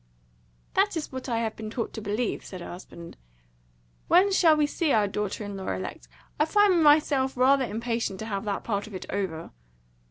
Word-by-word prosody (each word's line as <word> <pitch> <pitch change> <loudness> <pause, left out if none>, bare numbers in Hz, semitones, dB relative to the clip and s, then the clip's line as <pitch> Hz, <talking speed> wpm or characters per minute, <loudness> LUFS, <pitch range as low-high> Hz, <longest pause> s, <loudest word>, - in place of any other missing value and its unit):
"That 390 -2 +2
is 310 - -4
what 260 0 -6
I 230 - 0
have 220 -1 -2
been 220 -1 -6
taught 230 0 -4
to 220 - -6
believe," 210 +3 -2
said 185 - -8
her 175 - -8
husband. 170 -1 -11 0.9
"When 370 +4 +5
shall 330 -5 +5
we 300 - +3
see 305 +1 0
our 210 -4 +3
daughter 210 +1 -3
in 205 0 -6
law 190 -1 -5
elect? 95 -9 -6 0.3
I 300 - +4
find 390 0 +4
myself 290 -3 +4
rather 265 +1 +4
impatient 230 -3 -2
to - - -4
have 200 -3 -3
that 200 -1 -2
part 205 -2 -2
of 210 - -9
it 185 - -6
over." 185 -5 -3
230 Hz, 195 wpm, -27 LUFS, 200-295 Hz, 0.9 s, When